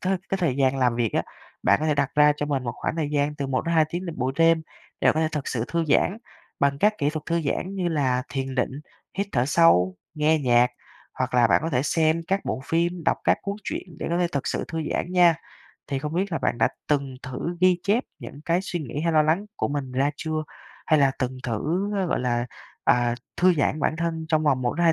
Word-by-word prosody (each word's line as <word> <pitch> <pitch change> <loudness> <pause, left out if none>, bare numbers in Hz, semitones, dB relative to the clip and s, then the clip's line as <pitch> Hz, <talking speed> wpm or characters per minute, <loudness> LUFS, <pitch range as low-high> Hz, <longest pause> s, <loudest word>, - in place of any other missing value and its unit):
thời 190 +1 +1
cái 195 - -1
thời 165 -8 0
gian 135 -1 +2
làm 125 -3 +2
việc 115 -3 0
á, - - +1 0.4
bạn - - +4
có 155 - 0
thể 150 - +2
đặt 140 -2 0
ra 150 0 +6
cho 150 - -2
mình 140 -3 -1
một 120 - -2
khoảng 150 - -3
thời 155 -3 -1
gian 145 0 0
từ 140 -2 -3
1-2 155 +5 +2
tiếng 180 +2 -4
vào 170 - -5
buổi 130 +1 0
đêm 165 0 +4 0.4
để - - +4
bạn - - +4
có 155 - +1
thể 160 - +2
thực 150 -3 -3
sự 115 -2 -1
thư 170 0 0
giãn 185 +7 +3 0.4
bằng 140 0 +2
các 210 +6 +2
kỹ 145 0 +1
thuật 155 -1 -6
thư 170 0 +1
giãn 180 +6 -2
như 185 -3 -1
là 130 -6 +1
thiền 135 -1 -3
định, 125 - 0 0.5
hít 200 - 0
thở 120 0 +2
sâu, 95 - +4 0.2
nghe 155 +1 +3
nhạc. 125 -2 +3 0.4
Hoặc - - -2
là 120 -1 +5
bạn - - +3
có 165 - -2
thể 130 -3 +1
xem 160 +2 +1
các 195 +1 +1
bộ - - -2
phim, 170 +2 0
đọc - - +3
các - - +3
cuốn 200 +1 -3
truyện 175 - -5
để - - -4
có 170 - +1
thể 180 - +2
thực 140 - -2
sự - - -1
thư 165 0 -3
giãn 180 - -2
nha. 175 -2 +6 0.5
Thì 140 - -2
không 150 +3 -4
biết 190 +2 -1
là 165 - 0
bạn - - -1
đã - - +4 0.2
từng 140 -3 0
thử 150 +7 -4
ghi 185 -1 +4
chép 220 +6 +1
những 140 - -10
cái 170 +2 +2
suy 175 -3 -4
nghĩ 145 0 -5
hay 165 +1 +1
lo 155 -1 +5
lắng 165 +7 +1
của - - -1
mình 140 -3 -3
ra 135 +3 +1
chưa? 155 0 -3 0.4
Hay 155 - +4
là 140 -2 +4
từng 130 0 -2
thử, 160 - -1
ờ, 190 -2 0
gọi - - 0
là, 120 -1 0 0.4
à, 120 -1 +3 0.2
thư 180 0 +4
giãn 150 0 0
bản 155 - 0
thân 165 -1 -2
trong 155 0 +2
vòng 135 -4 +2
1-2 165 +7 +2
155 Hz, 250 wpm, -25 LUFS, 135-170 Hz, 0.5 s, ra